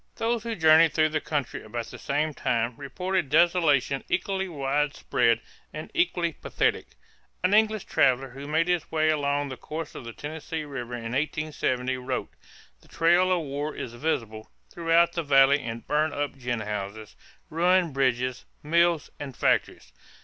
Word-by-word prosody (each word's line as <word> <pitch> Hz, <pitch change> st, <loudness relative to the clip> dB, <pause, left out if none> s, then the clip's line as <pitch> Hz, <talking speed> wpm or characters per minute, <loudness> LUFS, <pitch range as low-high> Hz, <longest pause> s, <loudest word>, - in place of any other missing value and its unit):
Those 230 Hz, 0 st, 0 dB
who 230 Hz, 0 st, -4 dB
journeyed 160 Hz, -1 st, +6 dB
through 155 Hz, -1 st, +3 dB
the 155 Hz, -1 st, -1 dB
country 145 Hz, -5 st, -3 dB
about 115 Hz, +2 st, -5 dB
the -, -, -11 dB
same 150 Hz, +2 st, -1 dB
time 120 Hz, -2 st, -1 dB
reported 180 Hz, +4 st, -2 dB
desolation 150 Hz, -4 st, +3 dB
equally 190 Hz, +1 st, -1 dB
widespread 140 Hz, -5 st, 0 dB, 0.3 s
and 155 Hz, +1 st, -8 dB
equally 170 Hz, -1 st, +1 dB
pathetic. -, -, -1 dB, 0.6 s
An 185 Hz, -, +3 dB
English 215 Hz, -1 st, +3 dB
traveler 130 Hz, +1 st, +2 dB
who 140 Hz, +3 st, -9 dB
made 160 Hz, +3 st, +1 dB
his 175 Hz, -3 st, -1 dB
way 155 Hz, -1 st, +2 dB
along 145 Hz, -1 st, 0 dB
the 130 Hz, -, -7 dB
course 160 Hz, 0 st, -6 dB
of -, -, -8 dB
the 115 Hz, -, -7 dB
Tennessee 155 Hz, +4 st, -6 dB
River 125 Hz, -4 st, -6 dB
in 120 Hz, -, -7 dB
1870 135 Hz, -3 st, -1 dB
wrote: 125 Hz, 0 st, -4 dB, 0.5 s
"The -, -, -22 dB
trail 175 Hz, +3 st, +3 dB
of 180 Hz, -2 st, +2 dB
war 145 Hz, +1 st, -4 dB
is 115 Hz, -, -6 dB
visible 115 Hz, -5 st, -3 dB, 0.2 s
throughout 170 Hz, 0 st, +3 dB
the 170 Hz, -, -1 dB
valley 140 Hz, -1 st, +5 dB
in 115 Hz, -1 st, -5 dB
burnt 150 Hz, 0 st, 0 dB
up 145 Hz, -1 st, -2 dB
gin 120 Hz, -3 st, -3 dB
houses, 105 Hz, 0 st, -5 dB, 0.4 s
ruined 175 Hz, 0 st, +2 dB
bridges, 130 Hz, -1 st, 0 dB, 0.2 s
mills, 170 Hz, +1 st, +2 dB
and 140 Hz, -3 st, -7 dB
factories -, -, 0 dB
150 Hz, 155 wpm, -26 LUFS, 130-165 Hz, 0.6 s, journeyed